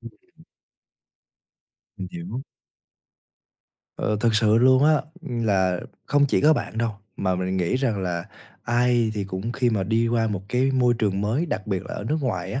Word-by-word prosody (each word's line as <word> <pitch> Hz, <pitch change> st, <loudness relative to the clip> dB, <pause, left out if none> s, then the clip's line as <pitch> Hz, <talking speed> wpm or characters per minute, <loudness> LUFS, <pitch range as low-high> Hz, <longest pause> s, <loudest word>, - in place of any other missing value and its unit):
Ừm. 365 Hz, -2 st, -16 dB, 1.5 s
Mình -, -, -6 dB
hiểu. 170 Hz, -7 st, -6 dB, 1.5 s
Ờ, 105 Hz, -, -1 dB
thực 115 Hz, -1 st, +2 dB
sự 110 Hz, 0 st, +4 dB
luôn 130 Hz, +3 st, +5 dB
á, 155 Hz, +1 st, +5 dB, 0.3 s
là 100 Hz, -, 0 dB, 0.3 s
không 145 Hz, +1 st, +3 dB
chỉ -, -, +1 dB
có 155 Hz, +2 st, +6 dB
bạn 115 Hz, -, -3 dB
đâu, 115 Hz, -1 st, +1 dB, 0.3 s
mà 95 Hz, -1 st, 0 dB
mình 95 Hz, +1 st, -2 dB
nghĩ 90 Hz, +7 st, +1 dB
rằng 115 Hz, -7 st, -1 dB
là 85 Hz, -2 st, -2 dB, 0.4 s
ai 120 Hz, -1 st, +2 dB
thì 100 Hz, -2 st, -2 dB
cũng 95 Hz, +4 st, -4 dB
khi 125 Hz, -1 st, +1 dB
mà 105 Hz, -4 st, 0 dB
đi 115 Hz, +4 st, +1 dB
qua 115 Hz, -1 st, +1 dB
một 100 Hz, -3 st, -3 dB
cái 125 Hz, +4 st, +1 dB
môi 125 Hz, -2 st, +3 dB
trường 100 Hz, -3 st, 0 dB
mới, 115 Hz, +11 st, 0 dB
đặc 145 Hz, -10 st, -3 dB
biệt 95 Hz, -4 st, -1 dB
là -, -, -6 dB
ở -, -, -5 dB
nước 150 Hz, +8 st, 0 dB
ngoài 95 Hz, -8 st, -2 dB
á, 130 Hz, -, -2 dB
115 Hz, 180 wpm, -24 LUFS, 100-130 Hz, 1.5 s, có